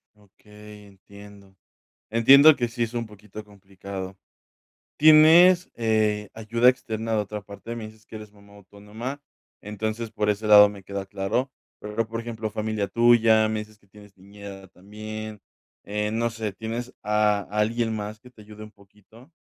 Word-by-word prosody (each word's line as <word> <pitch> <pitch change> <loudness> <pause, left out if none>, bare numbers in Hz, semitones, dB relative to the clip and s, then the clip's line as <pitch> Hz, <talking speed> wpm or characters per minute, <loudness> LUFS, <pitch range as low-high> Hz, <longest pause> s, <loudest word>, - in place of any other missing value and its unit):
Okey, 105 0 -16
entiendo. 100 0 -16 0.5
Entiendo 140 +7 +7
que 120 -3 -2
sí 120 0 -3
es 115 0 -5
un 120 -1 -3
poquito 105 0 -12
complicado. 95 -1 -10 0.8
¿Tienes, 160 +4 +6
eh, 110 -2 0
ayuda 115 +2 +1
externa 115 -3 -2
de 110 - +1
otra 105 0 -5
parte? 100 +4 -9
Me 115 -2 -7
dices 110 0 -19
que - - -15
eres 105 -1 -11
mamá 100 0 -20
autónoma, 105 +7 -9 0.4
entonces, 110 +2 -5
por 105 -1 0
ese 105 +1 -3
lado 105 -1 +8
me 100 -2 -12
queda 100 0 -6
claro. 100 +7 -2 0.3
Pero, 105 +2 -3
por 115 +1 -5
ejemplo, 115 -2 -5
familia 110 -1 -3
tuya, 115 0 +4
me 110 0 -2
dices 105 0 -12
que 100 - -31
tienes 105 0 -18
niñera 100 0 -12
también, 110 +3 -9 0.4
eh, 105 +1 -3
no 115 +1 -1
sé, 110 -2 -5
¿tienes 115 +5 -6
a 105 -1 +1
alguien 110 +2 -1
más, 105 0 -6
que 125 - -17
te 115 -3 -17
ayude 105 0 -13
un 110 - -11
poquito? 105 - -21
105 Hz, 160 wpm, -24 LUFS, 105-115 Hz, 0.8 s, lado